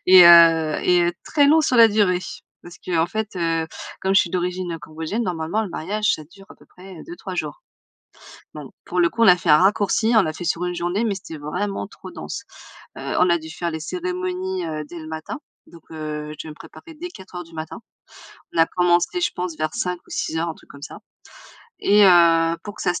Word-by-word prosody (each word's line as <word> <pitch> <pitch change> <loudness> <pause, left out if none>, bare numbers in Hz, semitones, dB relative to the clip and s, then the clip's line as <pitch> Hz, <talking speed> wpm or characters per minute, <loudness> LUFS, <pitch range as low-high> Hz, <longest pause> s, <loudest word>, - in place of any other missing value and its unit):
et 185 -1 +9
heu 165 -2 +7
et 175 -1 +3
très 290 -2 +3
long 315 +3 +5
sur 255 - +1
la 230 -1 +8
durée. 205 -4 +2 0.4
Parce 175 0 -12
qu'en 165 -2 +1
fait, 215 +1 -4
heu, 165 -2 0 0.4
comme 190 0 +1
je 195 - +7
suis 170 - -2
d'origine 180 0 -2
heu, 165 - -5
cambodgienne, 160 +8 -4
normalement 175 +3 -2
le 200 - -6
mariage 210 +5 -1
ça 155 - -9
dure 195 +6 -17
à - - -12
peu - - -21
près 185 +1 -14
heu, - - -10
2-3 335 - -8
jours. 155 -4 -5 0.9
Donc 150 -3 -9
pour 180 - -1
le 170 - +4
coup, 230 - -2
on - - +6
a 180 - +8
fait 175 - -5
un 150 - +7
raccourci, 205 +4 +2
on 220 - +7
l'a 155 -3 -3
fait 175 - -7
sur 170 +1 -1
1 180 - -3
journée, 175 +5 -1
mais 215 -3 0
c'était 170 -4 -9
vraiment 180 +7 -3
trop - - -12
dense. - - -7 0.6
Heu, - - -4
on 180 - +4
a 170 - +3
dû 160 0 -10
faire 170 +1 -4
les 160 -1 -5
cérémonies, 180 +1 -3
heu, 155 -1 -4
dès 175 - -9
le 155 -1 -9
matin, 160 +7 -6 0.3
donc, 170 -2 -16
heu, 150 -1 -6
je 150 - -12
devais - - -7
me - - -9
préparer 325 - -14
dès 340 +4 -7
4:00 185 - -10
du 165 - -19
matin. 155 0 -7 0.7
On - - -2
a 165 - +6
commencé, 175 - +1
je - - +2
pense, 180 -3 -4
vers 155 0 -2
5 180 0 -2
ou - - -21
6:00, 165 +1 -2
un - - -7
truc - - -21
comme 140 - -13
ça. 160 - -8 0.8
Et 205 0 +5
heu, 165 -2 +5
pour 205 - -7
que - - -6
ça 180 - +1
se - - -4
175 Hz, 230 wpm, -22 LUFS, 160-190 Hz, 0.9 s, et